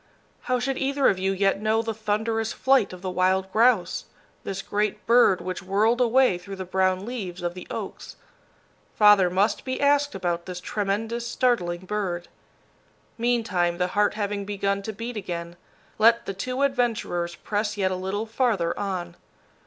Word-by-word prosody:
How 255 - +3
should 265 +2 -2
either 275 0 +2
of 185 - 0
you 190 +1 +1
yet 195 +1 +1
know 220 +1 +1
the 225 0 -2
thunderous 220 +1 -1
flight 265 -5 +3
of 180 0 -10
the 185 - -2
wild 185 +1 +1
grouse, 225 -3 +2 0.4
this 195 0 -4
great 210 0 -2
bird 230 -6 +5
which 185 +1 -4
whirled 210 +6 +2
away 245 -5 +3
through 195 +2 -8
the 190 -1 -6
brown 185 +1 +1
leaves 190 -7 -5
of 175 0 -1
the 180 - -10
oaks? - - -6 0.8
Father 210 -4 +6
must 195 +4 +1
be 260 -1 -3
asked 285 -1 +2
about 175 -2 -2
this 180 -1 -5
tremendous, 220 +5 -2
startling 210 -10 0
bird. 185 -4 -3 0.9
Meantime, 220 -8 +1
the 180 0 0
heart 205 +2 +1
having 205 -1 -2
begun 200 0 -1
to 220 - -5
beat 230 +2 -6
again, 170 -3 -5 0.4
let 230 +2 +5
the 195 - -3
two 255 +8 -2
adventurers 230 -10 0
press 210 0 -2
yet 190 -2 +1
a - - -1
little 190 +4 -3
farther 220 -7 0
on. 180 -4 -3
205 Hz, 165 wpm, -25 LUFS, 185-230 Hz, 0.9 s, Father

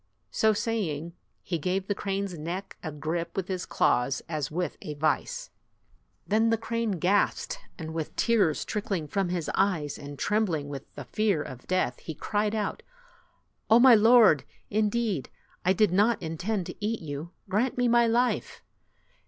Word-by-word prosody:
So 220 - +3
saying, 175 -8 -2 0.3
he 170 -3 -2
gave 185 +4 -1
the 205 - 0
crane's 195 -2 -3
neck 175 +5 -5
a 160 - -4
grip 160 +3 -3
with 190 -2 -1
his 185 -2 -3
claws 125 +2 +1
as 155 -4 -2
with 170 0 -2
a 150 - -6
vise. 320 - -1 0.7
Then 220 +2 +3
the 225 - +3
crane 230 -1 -1
gasped, 195 - +1 0.2
and 160 -1 -6
with 160 -2 -4
tears 210 -10 +2
trick 210 -1 -4
ling 170 -7 -1
from 195 +2 -1
his 175 -3 -2
eyes, 165 -7 0
and 145 0 -8
trembling 175 -9 0
with 140 -1 -8
the - - -7
fear 205 -8 +1
of 125 -1 -10
death, 185 -9 0
he 160 - -7
cried 210 +4 -1
out, 210 -1 -2 0.9
"Oh, 225 - +8
my 255 0 +8
lord! 225 - +6 0.3
Indeed, 215 - 0 0.3
I 185 - +3
did 200 0 +3
not 210 +4 +3
intend 180 +4 -2
to - - -7
eat 225 +2 -1
you. 150 +1 -5 0.2
Grant 235 +7 0
me 245 0 +3
my 235 0 +5
life." 240 +2 0
190 Hz, 165 wpm, -28 LUFS, 160-220 Hz, 0.9 s, Oh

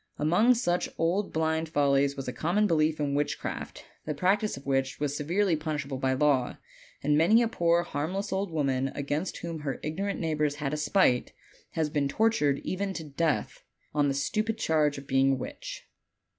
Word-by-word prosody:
Among 195 +12 +4
such 175 -7 0
old 180 +5 0
blind 160 0 0
follies 140 -2 +2
was 135 - -5
a 125 - -3
common 175 - +1
belief 155 -4 +2
in 145 -1 0
witchcraft, 145 +1 -3 0.2
the 150 - -3
practice 195 +4 +1
of 135 - -11
which 135 -1 0
was 145 -1 -1
severely 175 +5 +1
punishable 150 -4 -3
by 130 0 +1
law; 135 -2 +2 0.5
and 145 +1 +3
many 200 +10 +5
a - - +2
poor 170 -5 +2
harmless 180 +9 -3
old 195 0 -1
woman, 135 -4 0
against 145 +5 -2
whom 165 -2 -5
her 145 -2 -4
ignorant 195 +7 -2
neighbors 150 -3 0
had 145 -1 -3
a - - -1
spite, 150 -5 +2 0.4
has 155 -2 -1
been 145 -2 +1
tortured 150 -6 +2
even 195 +1 -2
to 165 - -5
death, 155 +1 -2 0.3
on 145 -1 +2
the 135 - 0
stupid 215 +10 -1
charge 155 -7 +1
of 140 - -8
being 135 0 +3
a - - +2
witch. - - -7
155 Hz, 180 wpm, -28 LUFS, 140-180 Hz, 0.5 s, many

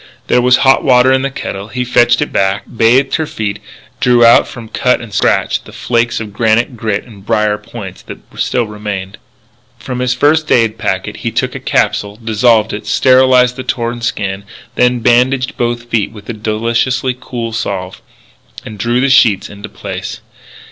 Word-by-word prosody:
There 125 - +2
was 125 0 +4
hot 135 0 +4
water 130 -1 +4
in 130 - +2
the 140 - -1
kettle. 100 -6 -6
He 125 +2 -3
fetched 120 0 +3
it - - -8
back, 95 +1 +1
bathed 125 +5 +3
her 160 - -2
feet, 105 -5 -4 0.4
drew 120 -1 +4
out 115 - +6
from 115 -2 -10
cut 125 +3 +1
and 115 -4 -10
scratch - - +1
the - - -14
flakes 120 0 -1
of 105 -2 -7
granite 115 +3 +1
grit 105 -3 -2
and 105 -5 -15
brier 105 -1 0
points 105 -3 -9
that - - -10 0.2
still 120 - 0
remained 105 -3 -5
there. - - -14 0.6
From 125 +1 -6
his 125 0 0
first 150 +3 +2
aid 115 -2 +2
packet - - -2
he - - -3
took - - -2
a - - -6
capsule, 100 0 0
dissolved 115 0 +2
it, 105 0 -6
sterilized 130 +1 +4
the 130 - -5
torn 120 -1 -3
skin, 100 -4 -3 0.3
then 125 -1 +2
bandaged 125 +2 +2
both 120 0 -2
feet 110 -3 0
with 105 -2 -13
a - - -2
deliciously 115 +4 -1
cool 115 -2 -5
salve, 95 -4 -4 0.6
and 105 -1 -9
drew 120 +4 0
the 140 - +2
sheets 110 -7 +3
into 100 0 -10
place. - - -7
115 Hz, 180 wpm, -14 LUFS, 105-125 Hz, 0.6 s, out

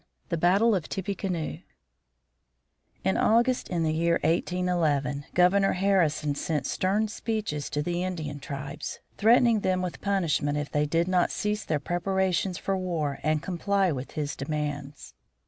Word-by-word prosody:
X. - - -41 0.2
THE 170 - 0
BATTLE 195 +7 +4
OF 180 -5 -1
TIPPECANOE 190 -4 -3 1.4
In 95 - +1
August, 240 +3 +2
in 170 -2 0
the 155 -1 +1
year 170 +1 +2
1811, 160 -5 0
Governor 195 +2 +4
Harrison 175 -6 +2
sent 150 +1 -2
stern 205 +4 +1
"speeches" 210 -9 -3
to 150 - -1
the 175 +2 -1
Indian 155 -6 -4
tribes, 140 +2 -6 0.2
threatening 230 +1 +5
them 185 -2 0
with 180 - -5
punishment 165 -7 0
if 150 -1 -3
they 150 0 +1
did 165 +3 +1
not 180 -1 +2
cease 210 +1 -2
their 155 -2 -1
preparations 185 +2 0
for 195 - -1
war 165 -7 -2
and 155 0 0
comply 190 +1 +1
with 135 -2 -5
his 150 -1 -3
demands. 145 -1 -4
175 Hz, 145 wpm, -27 LUFS, 150-195 Hz, 1.4 s, threatening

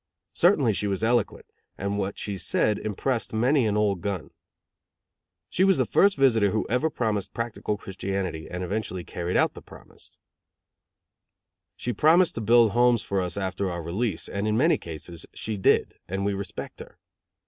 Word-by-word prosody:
Certainly 150 - +3
she 105 - -2
was 100 +1 -1
eloquent, 120 +1 +1 0.3
and 100 +1 -2
what 100 0 -3
she 100 - -3
said 105 +2 0
impressed 110 +2 -2
many 125 +2 +3
an 105 0 0
old 100 -4 +1
gun. 95 -3 -4 1.2
She 185 - +1
was 190 0 +4
the - - +2
first 200 -3 +3
visitor 115 -7 +4
who 110 +2 -1
ever 125 +6 +2
promised 110 -8 -2
practical 115 -3 -3
Christianity 95 -4 -4
and 90 +1 -4
eventually 95 -1 -3
carried 85 +1 -3
out - - +2
the - - -11
promise. - - -13 1.6
She 120 - -3
promised 160 - +4
to 115 - -4
build 115 0 +5
homes 120 0 +3
for 100 -1 -1
us 90 +2 -4
after 95 0 -2
our 85 -1 -4
release; 95 +3 -2
and 100 +2 -3
in 110 0 +1
many 160 +7 +3
cases, 85 +1 -8
she 110 - -3
did, 95 - +2
and 95 +2 -2
we 100 - +1
respect 100 -2 -6
her. - - -12
105 Hz, 170 wpm, -26 LUFS, 95-120 Hz, 1.6 s, build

